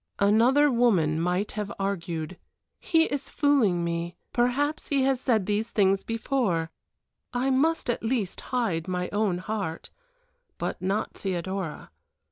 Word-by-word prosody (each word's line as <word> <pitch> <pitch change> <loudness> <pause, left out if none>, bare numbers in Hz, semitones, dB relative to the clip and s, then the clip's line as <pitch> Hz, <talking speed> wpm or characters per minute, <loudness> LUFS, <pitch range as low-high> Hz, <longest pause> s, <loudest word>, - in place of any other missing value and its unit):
Another 240 +8 +4
woman 190 -11 +3
might 180 +4 0
have 210 -1 -4
argued, 175 -3 -3 0.4
"He 325 -2 +3
is 285 -3 -3
fooling 240 - +2
me; 170 +1 -2 0.2
perhaps 275 +5 +1
he 275 -2 +2
has 265 -1 +1
said 225 -7 +2
these 210 +3 -1
things 195 -3 +2
before 225 -8 -1 0.6
I 255 +2 +1
must 315 +5 +2
at 240 - -1
least 225 -5 -1
hide 220 -11 0
my 180 -1 -2
own 205 -3 0
heart," 195 -4 -4 0.7
but - - -3
not 195 +3 -1
Theodora. 185 -2 -4
210 Hz, 130 wpm, -27 LUFS, 180-250 Hz, 0.7 s, Another